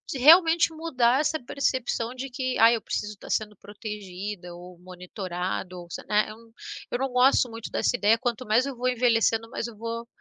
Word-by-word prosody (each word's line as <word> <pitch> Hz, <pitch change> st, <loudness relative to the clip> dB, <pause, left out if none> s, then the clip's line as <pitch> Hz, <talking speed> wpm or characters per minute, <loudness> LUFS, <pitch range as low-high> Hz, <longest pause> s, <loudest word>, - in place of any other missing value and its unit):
e 265 Hz, -, -4 dB
realmente 325 Hz, +3 st, +6 dB
mudar 270 Hz, -5 st, +1 dB
essa 315 Hz, +1 st, 0 dB
percepção 245 Hz, -3 st, -2 dB
de 265 Hz, +2 st, -6 dB
que: 255 Hz, 0 st, -3 dB
"Ah, 225 Hz, +1 st, +7 dB
eu 225 Hz, -, -1 dB
preciso 210 Hz, 0 st, -4 dB
estar 200 Hz, -, -13 dB
sendo 210 Hz, -1 st, -1 dB
protegida 205 Hz, -3 st, -7 dB
ou 180 Hz, 0 st, -12 dB
monitorado 180 Hz, 0 st, -5 dB
ou 175 Hz, -, -11 dB
se" -, -, -6 dB
né? 210 Hz, 0 st, +2 dB
Eu 215 Hz, -, -10 dB, 0.5 s
eu 245 Hz, -, -1 dB
não 270 Hz, 0 st, -1 dB
gosto 250 Hz, 0 st, +4 dB
muito 225 Hz, 0 st, -8 dB
dessa -, -, +1 dB
ideia, 215 Hz, +2 st, +4 dB
quanto 245 Hz, 0 st, -2 dB
mais 220 Hz, +5 st, +3 dB
eu 275 Hz, -1 st, -5 dB
vou 250 Hz, +1 st, -2 dB
envelhecendo, 225 Hz, -2 st, +2 dB
mais 235 Hz, -, -4 dB
eu 225 Hz, -, -11 dB
vou 230 Hz, +1 st, -5 dB
230 Hz, 195 wpm, -26 LUFS, 210-255 Hz, 0.5 s, Ah